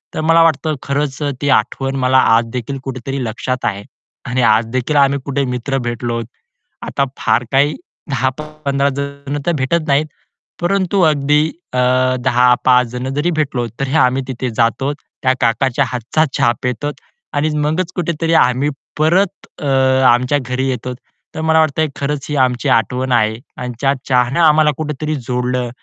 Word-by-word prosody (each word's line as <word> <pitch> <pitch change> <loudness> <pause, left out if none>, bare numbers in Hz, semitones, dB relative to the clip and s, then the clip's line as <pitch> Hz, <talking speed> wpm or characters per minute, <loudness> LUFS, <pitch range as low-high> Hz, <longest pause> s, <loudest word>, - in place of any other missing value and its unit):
तर 155 - -1
मला 165 +1 +4
वाटतं 155 -1 +1
खरंच 140 0 -2
अ, 145 - 0
ती 145 - 0
आठवण 135 +5 -2
मला 130 +1 +4 0.2
आज 115 0 +2
देखील 130 +3 -4
कुठेतरी 135 0 -4
लक्षात 125 +3 -3
आहे. 100 -1 -2 0.4
आणि 125 -1 -1
आज 110 0 +4
देखील 140 +4 -1
आम्ही 140 0 +3
कुठे 140 0 -1
मित्र 125 +2 -2
भेटलो, 120 0 -2 0.6
आता 140 - -1
फार 125 - +1
काही 140 +3 +3 0.4
10-15 140 +1 -1
जण 140 +1 -4
तर 175 - +2
भेटत 155 +4 0
नाहीत, 140 +2 +2 0.6
परंतु 190 +1 +1
अगदी 150 -1 +3 0.3
अ, 125 - 0 0.4
10-5 125 0 +4
जण 125 +1 -4
जरी 165 +4 +1
भेटलो, 140 -6 -1
तरी 135 +1 -2
आम्ही 130 +2 0
तिथे 130 -1 -3
जातो, 135 +5 +1 0.3
त्या 130 0 +4
काकाच्या 120 +2 +2
हातचा 125 +6 0
चहा 120 - +3
पितो 125 +4 -2 0.4
आणि 145 +2 +1 0.2
मगच 170 +4 -1
कुठेतरी 165 -1 -1
आम्ही 130 0 +3 0.3
परत 185 +5 +1
अ, 145 - -2 0.5
आमच्या 125 +4 +1
घरी 130 +1 -1
येतो. 125 0 -3 0.4
तर 160 - -3
मला 160 0 +3
वाटतंय 155 0 +2
खरंच 140 0 -2
ही 150 - -2
आमची 125 -1 -2
आठवण 125 +4 -2
आहे. 110 -2 +2 0.2
आणि 125 -1 -5
त्या 135 0 +3 0.2
चहानं 125 +5 +2
आम्हाला 155 -1 +5
कुठेतरी 155 0 -3
जोडलं, 125 -1 -2
135 Hz, 155 wpm, -17 LUFS, 125-150 Hz, 0.6 s, आम्हाला